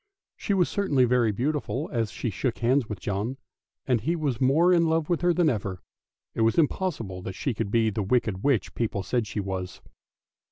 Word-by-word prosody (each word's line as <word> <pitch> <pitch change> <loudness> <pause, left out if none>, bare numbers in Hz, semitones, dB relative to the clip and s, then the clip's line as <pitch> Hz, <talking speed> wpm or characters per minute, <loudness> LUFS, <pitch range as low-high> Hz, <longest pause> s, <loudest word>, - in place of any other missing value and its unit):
She 200 - -1
was 180 -3 +3
certainly 150 -11 +2
very 120 -2 +2
beautiful 145 - -2
as 115 -3 0
she 105 +5 -3
shook 125 +4 -2
hands 125 0 +1
with 105 -3 -5
John, 105 +7 -3 0.5
and 125 -4 +1
he 165 +9 0
was 145 -7 -2
more 160 +8 +4
in 170 -1 +4
love 160 -1 0
with 170 - +1
her 175 0 +3
than 175 -1 +2
ever; 100 -8 -2 0.5
it - - -2
was 115 0 +3
impossible 145 - 0
that 95 0 -6
she 135 - -2
could 110 -1 -3
be 110 0 +2
the 105 +1 -2
wicked 105 -2 0
witch 130 -10 +1
people 105 -4 -2
said 120 +3 -1
she 110 - -4
was. 95 -2 -4
120 Hz, 200 wpm, -26 LUFS, 105-150 Hz, 0.5 s, more